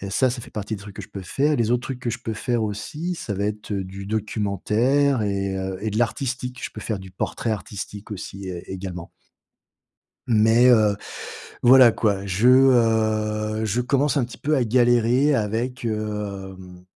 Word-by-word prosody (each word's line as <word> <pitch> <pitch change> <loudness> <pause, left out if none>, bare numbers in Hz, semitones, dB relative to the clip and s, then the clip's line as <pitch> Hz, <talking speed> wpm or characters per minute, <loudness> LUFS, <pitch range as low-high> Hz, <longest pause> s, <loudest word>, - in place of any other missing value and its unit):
Et 100 0 -6
ça, 130 +6 +2
ça 120 0 -4
fait - - -11
partie 105 +1 -4
des - - -12
trucs 100 -1 -11
que - - -6
je - - -11
peux 100 - -8
faire. 145 +11 +1
Les 115 -1 +1
autres 125 0 +1
trucs 130 0 -5
que 120 -2 -2
je 120 - -4
peux 115 - -3
faire 120 +1 -1
aussi, 150 - -4
ça 105 - -4
va 100 +1 -2
être, 105 0 -5
heu, 100 -1 -1
du 95 +1 -8
documentaire 110 +6 +1
et 100 -1 -1
heu, 95 0 -4
de 105 - -2
l'artistique. 125 +2 -2
Je - - -4
peux 110 - -9
faire 105 0 -3
du 95 0 -11
portrait 105 +4 -3
artistique, 105 0 -6
aussi, 100 -1 -7
é 90 -2 -7
également 90 -2 -6 1.2
mais, 115 +2 +5
heu, 110 -4 +4 0.7
voilà 125 -1 +8
quoi, 100 -3 0
je, 100 +5 +1
heu, 110 -4 +3
je 110 +3 0
commence 140 +4 +1
un 130 - +2
petit 125 - -11
peu 155 +2 0
à 130 -4 +2
galérer 120 +4 +3
avec, 120 +2 -2
hem, 100 -4 -5
110 Hz, 185 wpm, -23 LUFS, 100-125 Hz, 1.2 s, voilà